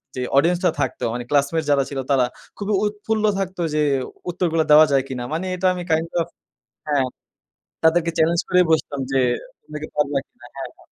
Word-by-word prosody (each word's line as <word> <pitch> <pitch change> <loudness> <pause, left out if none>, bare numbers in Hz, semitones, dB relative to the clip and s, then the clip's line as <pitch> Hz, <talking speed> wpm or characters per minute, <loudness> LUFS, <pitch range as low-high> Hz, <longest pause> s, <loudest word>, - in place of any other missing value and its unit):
যে 125 - -3 0.2
অডিয়েন্স 170 +4 +4
টা - - +6
থাকতো - - -2
মানে 120 0 -3
ক্লাসমেট 145 +3 +2
যারা 140 -1 +4
ছিল 140 -2 -4
তারা 130 -2 +4 0.3
খুবই 205 0 -2
উৎফুল্ল 210 +1 -2 0.2
থাকতো 185 -2 -3
যে 150 - +2 0.5
উত্তরগুলা 165 -2 0
দেওয়া 155 +1 +9
যায় 135 -1 +3
কিনা! 125 -2 -5
মানে 170 +4 -2
এটা 185 +1 +1
আমি 180 -1 -5
কাইন্ড 160 +1 +1
অফ 165 - -3 0.6
হ্যাঁ 140 -3 +2 0.8
তাদেরকে 165 +1 +3
চেলেঞ্জ 165 +1 +3
করেই 180 -1 +4
বসতাম 145 -3 0
যে 135 - +2 0.4
তুমি 150 - -8
কি 155 - -5
পারবা 145 -1 +1
কিনা? 120 - -18
হ্যাঁ, 135 - -5
হ্যাঁ। - - -21
160 Hz, 185 wpm, -22 LUFS, 140-175 Hz, 0.8 s, দেওয়া